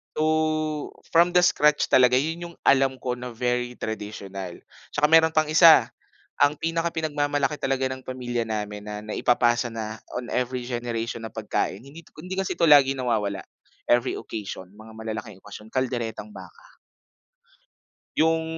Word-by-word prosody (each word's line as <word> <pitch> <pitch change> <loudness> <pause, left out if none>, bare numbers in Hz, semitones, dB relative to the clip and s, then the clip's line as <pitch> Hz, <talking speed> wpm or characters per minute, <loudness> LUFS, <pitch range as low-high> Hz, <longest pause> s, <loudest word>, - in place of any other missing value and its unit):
So, 155 -1 0 0.2
from 170 +1 +4
the 180 - +6
scratch 150 -4 +3
talaga, 125 -1 +5
'yun 165 +6 -1
'yung - - -23
alam 135 -1 +3
ko 125 -1 -2
na 125 0 -7
very 125 +1 -1
traditional. 100 -5 -6 0.3
'Tsaka 150 0 +2
meron 160 0 +5
pang 155 -1 +2
isa, 165 +1 +7 0.5
ang 145 +1 +4
pinaka 165 +2 -2
pinag-mamalaki 145 -2 -1
talaga 135 -1 -1
ng 130 0 -7
pamilya 120 -2 -3
namin 105 -1 -4
na 105 0 -6
naipapasa 120 +2 +1
na 110 -1 -5 0.2
on 125 -1 -5
every 125 0 -2
generation 115 -2 -3
na 110 - -9
pagkain, 110 -2 -2
hindi 145 +6 -13
'to - - -23
hindi 185 +2 -6
kasi 195 -1 -1
ito 170 -2 +2
lagi 140 -2 +7
nawawala, 110 -7 -1 0.5
every 120 +1 +3
occasion, 100 -4 -7
mga 110 0 -13
malalaking 110 -2 -7
okasyon, 105 +1 -12
kalderetang 125 - -2
baka. - - -14 1.4
'Yung 160 +1 +2
130 Hz, 150 wpm, -25 LUFS, 110-155 Hz, 1.4 s, isa